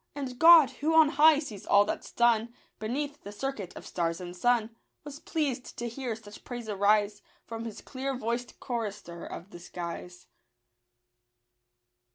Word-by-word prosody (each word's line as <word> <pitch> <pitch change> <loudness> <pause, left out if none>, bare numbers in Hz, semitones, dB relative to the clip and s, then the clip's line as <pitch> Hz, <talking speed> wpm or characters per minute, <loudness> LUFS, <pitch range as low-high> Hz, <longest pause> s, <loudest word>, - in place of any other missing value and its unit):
And 260 -3 -5
God, 325 -5 +9
who 315 +3 -1
on 320 -2 +7
high 300 +2 +6
sees 260 -10 -6
all 200 0 +6
that's - - -4
done 235 0 +2 0.2
Beneath 285 +6 -3
the 205 - -9
circuit 210 -3 -5
of - - -10
stars 170 -1 -2
and 175 -1 -7
sun, 230 +2 +1 0.3
Was 290 -1 -9
pleased 280 -7 -3
to 240 - -3
hear 235 -1 -4
such 210 -1 -13
praise 240 -2 -7
arise 205 0 +2 0.2
From 230 0 -6
his 225 - -7
clear 265 0 -4
voiced 235 +1 -3
chorister 205 -8 -5
of 185 +5 -8
the 175 - -10
skies. 175 +1 -7
235 Hz, 155 wpm, -29 LUFS, 205-270 Hz, 0.3 s, God